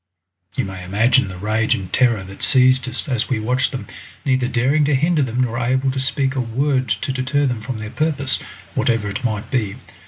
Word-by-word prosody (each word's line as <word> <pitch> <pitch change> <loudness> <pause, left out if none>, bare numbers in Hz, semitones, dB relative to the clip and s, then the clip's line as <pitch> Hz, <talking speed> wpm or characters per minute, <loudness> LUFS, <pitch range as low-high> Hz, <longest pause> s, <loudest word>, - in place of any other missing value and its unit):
You - - +1
may 95 -1 -7
imagine 105 +6 +3
the 95 -1 -7
rage 110 +3 +1
and 95 -2 -7
terror 120 -6 +3
that 95 +1 -11
seized 130 0 +4
us - - -3
as 125 -5 +1
we 125 -4 0
watched 125 +4 0
them, 130 - -5 0.4
neither 130 -2 +2
daring 135 +5 +2
to 145 -1 +2
hinder 155 +3 +2
them 125 -2 -1
nor 120 -2 0
able 130 +2 +1
to 135 - -3
speak 130 0 +1
a 130 - -1
word 130 +2 0
to 105 +6 -1
deter 130 +3 0
them 125 -4 -1
from 120 +1 -5
their 110 0 -6
purpose, 140 0 +1 0.3
whatever 115 -3 +1
it 100 - -5
might 110 -4 -2
be. 110 -7 0
125 Hz, 210 wpm, -20 LUFS, 110-130 Hz, 0.4 s, seized